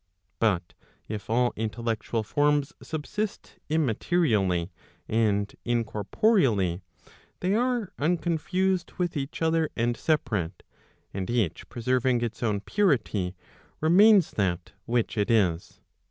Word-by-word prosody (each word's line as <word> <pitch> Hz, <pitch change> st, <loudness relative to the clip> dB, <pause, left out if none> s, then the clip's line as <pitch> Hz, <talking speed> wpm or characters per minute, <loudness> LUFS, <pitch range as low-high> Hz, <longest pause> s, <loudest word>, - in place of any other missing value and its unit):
But 95 Hz, -7 st, +1 dB, 0.3 s
if 105 Hz, 0 st, -6 dB
all 120 Hz, +2 st, +2 dB
intellectual 115 Hz, 0 st, -2 dB
forms 145 Hz, +4 st, +1 dB
subsist 195 Hz, +7 st, -5 dB
immaterially 115 Hz, -, +1 dB, 0.4 s
and 105 Hz, -2 st, +1 dB
incorporeally, 115 Hz, -, +1 dB, 0.6 s
they 185 Hz, +2 st, +1 dB
are 240 Hz, -2 st, 0 dB
unconfused 175 Hz, +3 st, 0 dB
with 175 Hz, -2 st, -1 dB
each 140 Hz, +3 st, -3 dB
other 160 Hz, -1 st, +2 dB
and 120 Hz, 0 st, 0 dB
separate, 110 Hz, -, -1 dB, 0.5 s
and 95 Hz, -1 st, -4 dB
each 115 Hz, -9 st, -1 dB
preserving 125 Hz, +1 st, +1 dB
its 115 Hz, -1 st, -4 dB
own 105 Hz, -4 st, 0 dB
purity, 110 Hz, -, 0 dB, 0.4 s
remains 190 Hz, +3 st, +6 dB
that 90 Hz, -4 st, -1 dB, 0.2 s
which 115 Hz, -1 st, 0 dB
it 105 Hz, -, +1 dB
is. 95 Hz, -7 st, +1 dB
120 Hz, 105 wpm, -27 LUFS, 105-160 Hz, 0.6 s, remains